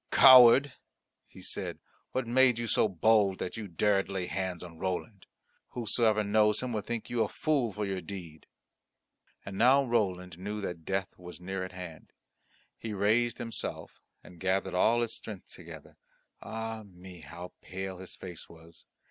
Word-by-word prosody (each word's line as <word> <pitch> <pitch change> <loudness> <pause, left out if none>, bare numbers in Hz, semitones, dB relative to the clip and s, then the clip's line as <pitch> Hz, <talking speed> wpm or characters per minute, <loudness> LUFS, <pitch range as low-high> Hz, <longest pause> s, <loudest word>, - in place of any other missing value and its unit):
"Coward," 130 +1 +8 0.5
he - - -14
said, - - -4 0.3
"what 130 -1 -1
made 125 0 +4
you 120 - -2
so 110 - +3
bold 100 +1 +3
that 90 - -4
you 110 -2 -6
dared 95 +2 +1
lay 95 -2 -2
hands 95 -2 -3
on 85 -2 -11
Roland? 95 +3 -4 0.5
Whosoever 110 -2 +2
knows 105 +2 +2
him 125 -2 -3
will 105 - -1
think 115 +1 -4
you 120 -1 +1
a - - -1
fool 140 -7 0
for 105 +1 -3
your 95 -2 -3
deed." 85 -7 -9 1.0
And 100 0 -6
now 130 +4 +6
Roland 90 -7 -1
knew 105 +3 -4
that 90 -4 -6
death 95 -1 -2
was 90 -2 -10
near 95 +1 -4
at 95 - -7
hand. 90 -3 -10 0.7
He 110 -2 -5
raised 110 +4 +2
himself 115 -1 -6 0.2
and 90 - -15
gathered 95 +1 0
all 115 +6 +3
his 115 - -2
strength 105 -4 -9
together - - -12 0.4
ah 110 0 -5
me! 90 -2 -13
how 85 +4 -10
pale 95 0 -6
his 95 - -8
face 90 -3 -9
was! 85 0 -15
100 Hz, 165 wpm, -30 LUFS, 90-115 Hz, 1.0 s, Coward